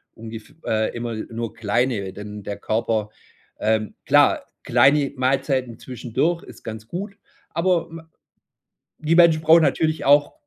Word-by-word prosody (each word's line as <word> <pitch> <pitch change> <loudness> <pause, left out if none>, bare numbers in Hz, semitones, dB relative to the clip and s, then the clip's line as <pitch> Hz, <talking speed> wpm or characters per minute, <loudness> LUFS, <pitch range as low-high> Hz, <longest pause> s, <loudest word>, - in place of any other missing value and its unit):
ungef 115 +5 -10
äh, 110 +1 0
immer 120 -1 -4
nur 115 +1 -5
kleine, 110 -2 -1
denn 105 0 -8
der 100 - -5
Körper, 110 -1 -1 0.5
ähm 110 -1 0
klar, - - +4 0.2
kleine 140 0 +3
Mahlzeiten 130 -2 0
zwischendurch 130 +7 -2
ist - - -14
ganz 110 0 -7
gut, 195 - -6 0.4
aber, 170 0 +1
ma 165 0 -11 0.9
die 155 +1 0
Menschen 165 -2 +6
brauchen 160 +1 +7
natürlich 155 0 +1
auch 145 +1 +4
125 Hz, 130 wpm, -22 LUFS, 110-155 Hz, 0.9 s, brauchen